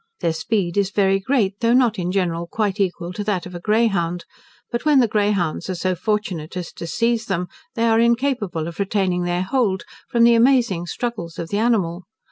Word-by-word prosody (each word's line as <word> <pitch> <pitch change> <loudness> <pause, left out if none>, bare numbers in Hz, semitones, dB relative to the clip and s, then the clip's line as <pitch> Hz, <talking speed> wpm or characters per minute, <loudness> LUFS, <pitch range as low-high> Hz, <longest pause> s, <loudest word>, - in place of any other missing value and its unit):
Their 165 - +1
speed 175 +1 -1
is 200 -1 +2
very 195 -1 +2
great, 205 -3 0
though 235 +1 +3
not 240 -5 +3
in 180 0 -1
general 170 -3 -1
quite 205 +1 -1
equal 180 -2 -1
to 205 - -4
that 200 -4 -1
of 180 - -9
a 175 - -6
greyhound; 180 -5 +1 0.5
but 235 - -2
when 300 -3 +5
the 240 - +4
greyhounds 205 -6 0
are 185 - -1
so 185 +2 0
fortunate 185 -4 -2
as 175 -2 -5
to 170 - -7
seize 230 +4 0
them, 180 -2 -1 0.3
they 230 - 0
are 225 -1 +4
incapable 235 - +1
of 170 +2 -8
retaining 190 -3 0
their 175 +1 0
hold, 200 -4 0 0.3
from 235 -1 +3
the 235 0 +7
amazing 235 -7 +3
struggles 215 -7 -4
of 165 - -5
the 205 - -1
animal. 195 -7 0
195 Hz, 200 wpm, -21 LUFS, 175-230 Hz, 0.5 s, the